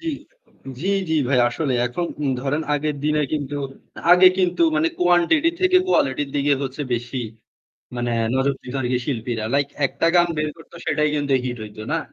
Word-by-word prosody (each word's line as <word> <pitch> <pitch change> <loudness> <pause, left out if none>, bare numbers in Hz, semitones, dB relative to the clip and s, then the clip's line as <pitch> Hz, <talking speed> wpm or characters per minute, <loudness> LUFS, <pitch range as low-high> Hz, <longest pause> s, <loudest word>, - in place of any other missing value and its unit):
জ্বি, 330 - -4 0.7
জ্বি, 190 +6 -1 0.2
জ্বি, 160 - +1
ভাই 130 -2 +3
আসলে 135 +2 -2
এখন 170 +8 -3 0.3
ধরেন 145 +4 -1
আগের 150 0 -1
দিনে 150 0 +2
কিন্তু 145 -1 -2 0.6
আগে 185 +1 +8
কিন্তু 180 -2 +1
মানে 160 +2 +2
কোয়ান্টিটি 180 - +3
থেকে 370 0 +4
কোয়ালিটির 140 - +1
দিকে 145 +1 +2
হচ্ছে 135 +2 -4
বেশি 120 +1 -4 0.7
মানে 120 0 -1 0.2
নজরদার 135 -1 -1 0.2
শিল্পীরা। 115 -4 -3
লাইক 140 0 +2 0.2
একটা 140 +5 -1
গান 175 0 +5
বের 155 0 0
করত 160 - -17
সেটাই 150 -1 +2
কিন্তু 145 -1 -1
হিট 125 -1 -3
হইতো 105 0 -9
না? 165 - +1
145 Hz, 160 wpm, -22 LUFS, 130-165 Hz, 0.7 s, আগে